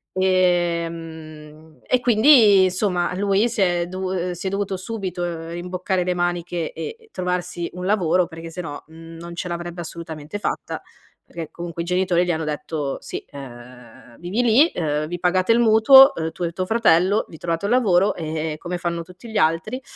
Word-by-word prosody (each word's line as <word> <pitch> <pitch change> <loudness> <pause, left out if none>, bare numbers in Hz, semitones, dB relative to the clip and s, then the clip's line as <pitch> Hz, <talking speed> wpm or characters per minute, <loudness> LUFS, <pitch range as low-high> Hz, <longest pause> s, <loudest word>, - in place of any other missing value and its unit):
Ehm, 165 -4 -1
e 255 - +3
quindi 220 -5 +6
somma 180 -2 -1
lui 200 +4 +2
si 225 -3 -2
è 175 -2 +1
dovu 185 -1 -3
si 175 - -8
è - - +1
dovuto 195 -1 -2
subito 175 -5 -5
rimboccare 180 +2 -2
le 180 - 0
maniche 175 -1 -2
e 450 - -8
trovarsi 180 -1 -3
un 180 0 -6
lavoro, 180 -4 +2
perché 165 -1 -9
se 180 - -5
no, 145 -3 -7
mhmm, 165 +1 -12
non 170 +1 -9
ce 180 - -4
l'avrebbe 175 0 -5
assolutamente 160 +1 -7
fatta. - - -4 0.5
Perché 165 -2 -8
comunque 170 -1 -6
i - - -8
genitori 180 0 +1
gli 180 - 0
hanno 160 -1 -2
detto: 150 -1 -3
"Sì, - - -7
ehm, 120 -3 -13
vivi 180 +7 -1
lì, 245 +8 +5
ehm, 155 - -2
vi 175 +1 -5
pagate 185 +4 +2
il 235 - +3
mutuo, 240 +5 +8
uhm, 160 0 -3
tu 175 - -6
e 170 - -1
tuo 185 +2 -3
fratello, 205 -3 +3
vi 160 - -11
trovate 165 +2 -3
un 210 - -1
lavoro, 200 -6 +3
ehm, 155 -1 -4
come 175 +2 -5
fanno 170 -1 -3
tutti 180 +7 -13
gli 215 - -2
altri", 200 +10 0
175 Hz, 175 wpm, -22 LUFS, 165-190 Hz, 0.5 s, mutuo